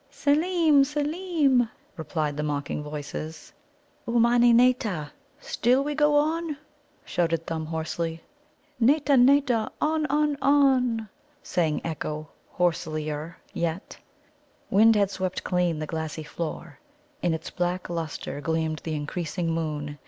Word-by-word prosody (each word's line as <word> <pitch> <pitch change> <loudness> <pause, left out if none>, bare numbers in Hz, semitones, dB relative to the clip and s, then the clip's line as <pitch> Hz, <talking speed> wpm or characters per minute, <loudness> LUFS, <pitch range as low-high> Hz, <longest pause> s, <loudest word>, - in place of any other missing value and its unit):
"Seelem, 305 +1 +3
Seelem!" 295 -3 +1 0.3
replied 155 -3 -2
the 150 - -2
mocking 145 -1 -2
voices. 150 +1 -7 0.5
"Ummani 240 +1 +4
nâta? 230 - +2 0.3
Still 250 +4 +2
we 295 +1 -2
go 295 0 +3
on?" 310 +1 +1 0.5
shouted 165 -2 0
Thumb 160 -1 -4
hoarsely. 165 +1 -3 0.6
"Nâta, 285 +3 +4
nâta! 260 -5 +3
On, 310 0 +1
on, 295 0 +1
on!" 260 -5 +3 0.4
sang 160 -4 0
echo 155 -1 -4 0.3
hoarselier 155 -2 -1 0.2
yet. 170 +3 -3 0.8
Wind 220 +3 +6
had 200 -2 +2
swept 185 -1 -3
clean 180 -3 0
the 155 - -3
glassy 160 0 -4
floor. 165 0 -6 0.4
In 170 -2 +1
its 160 - -7
black 180 +1 -2
lustre 165 -3 -4
gleamed 160 +1 -1
the 160 -1 -4
increasing 165 +3 -3
moon. 150 -3 -3
180 Hz, 115 wpm, -26 LUFS, -, 0.8 s, Wind